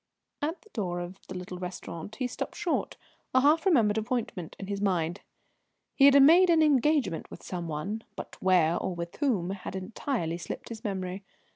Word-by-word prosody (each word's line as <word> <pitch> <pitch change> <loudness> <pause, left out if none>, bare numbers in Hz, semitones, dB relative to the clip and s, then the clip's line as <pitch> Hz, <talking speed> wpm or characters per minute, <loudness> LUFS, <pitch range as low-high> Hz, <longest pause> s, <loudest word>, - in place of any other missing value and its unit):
At 315 +5 -3
the 430 - -21
door 180 -5 -2
of 175 +2 -7
the 185 - -7
little 180 0 -7
restaurant 180 +2 -6
he 255 - -2
stopped 245 - -4
short, - - -1 0.4
a 260 - +6
half 310 +6 +4
remembered 220 - +4
appointment 215 -7 -3
in 195 - -6
his 200 0 -4
mind. 180 -2 0 0.7
He 275 - +5
had 280 0 +8
made 345 +5 +7
an 325 -2 +5
engagement 285 - +2
with - - -11
some 175 -2 -4
one, 190 +9 -4
but - - -8
where, 175 -3 +4
or 185 - -3
with 170 0 -6
whom, 210 - 0
had 195 -1 -6
entirely 185 - -3
slipped - - -6
his 230 0 -8
memory. 190 -2 -3
200 Hz, 180 wpm, -29 LUFS, 180-265 Hz, 0.7 s, had